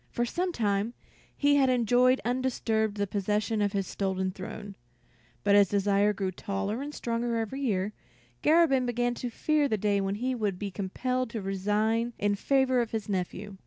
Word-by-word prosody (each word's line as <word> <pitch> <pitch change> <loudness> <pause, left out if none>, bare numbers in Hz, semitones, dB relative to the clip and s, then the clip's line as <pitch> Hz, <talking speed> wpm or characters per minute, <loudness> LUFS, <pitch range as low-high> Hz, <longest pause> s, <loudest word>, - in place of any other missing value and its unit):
For 240 - -1
some 360 +9 -1
time 210 -3 -1 0.4
he 285 0 +4
had 270 -2 +4
enjoyed 250 +1 +4
undisturbed 230 -4 0
the 205 - +1
possession 210 +2 -1
of 205 -1 +1
his 195 -1 0
stolen 190 -1 -2
throne; 195 +2 -8 0.7
but 200 - +3
as 200 -2 +6
Desire 205 +1 +2
grew 195 -2 -2
taller 200 +5 -3
and 290 +1 -5
stronger 235 -3 -2
every 230 +4 -3
year, 205 -5 0 0.5
Garabin 300 -6 +4
began 245 0 0
to 245 +1 -4
fear 300 +5 +1
the 220 - 0
day 200 0 +1
when 195 +1 -1
he 255 +5 -1
would 210 -6 -1
be 200 +1 -4
compelled 250 +6 -2
to 230 - -4
resign 210 +5 0
in 205 0 +1
favor 260 +3 +2
of 235 - -2
his 220 -2 -4
nephew. 195 +1 -3
215 Hz, 175 wpm, -28 LUFS, 200-250 Hz, 0.7 s, as